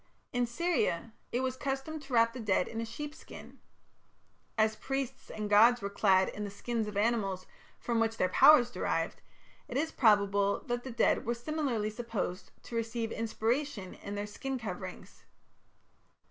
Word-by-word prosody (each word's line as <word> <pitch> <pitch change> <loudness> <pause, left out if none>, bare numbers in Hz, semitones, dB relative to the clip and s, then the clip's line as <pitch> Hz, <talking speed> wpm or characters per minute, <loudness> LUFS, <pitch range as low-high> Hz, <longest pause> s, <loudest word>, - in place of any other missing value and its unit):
In 245 -1 +1
Syria 235 - 0 0.2
it 245 - 0
was 260 0 -1
customary 275 +3 -3
to 275 -2 -10
wrap 230 0 +4
the 255 - -7
dead 200 -5 +1
in 225 - -4
a - - -2
sheep 295 +6 -6
skin. - - -12 1.0
As 220 0 +3
priests 265 +3 -4
and 215 -1 -4
gods 225 +4 +6
were 200 -2 -4
clad 190 -2 +4
in 210 - -5
the 205 - -3
skins 220 +2 -3
of 210 -1 -5
animals 205 -4 0 0.3
from 235 -1 -1
which 225 0 +1
their 185 - +3
powers 245 +5 +7
were - - -8
derived, - - -1 0.5
it 245 - -3
is 315 +3 0
probable 200 -3 +3
that 240 0 -3
the 265 - -6
dead 235 - +2
were 235 +1 -1
similarly 240 -5 -1
supposed 220 -5 -4
to 235 - -8
receive 230 0 -2
inspiration 230 -1 -2
in 200 - -7
their 205 0 -2
skin 265 +6 -4
coverings. 190 -5 -7
230 Hz, 170 wpm, -31 LUFS, 205-255 Hz, 1.0 s, powers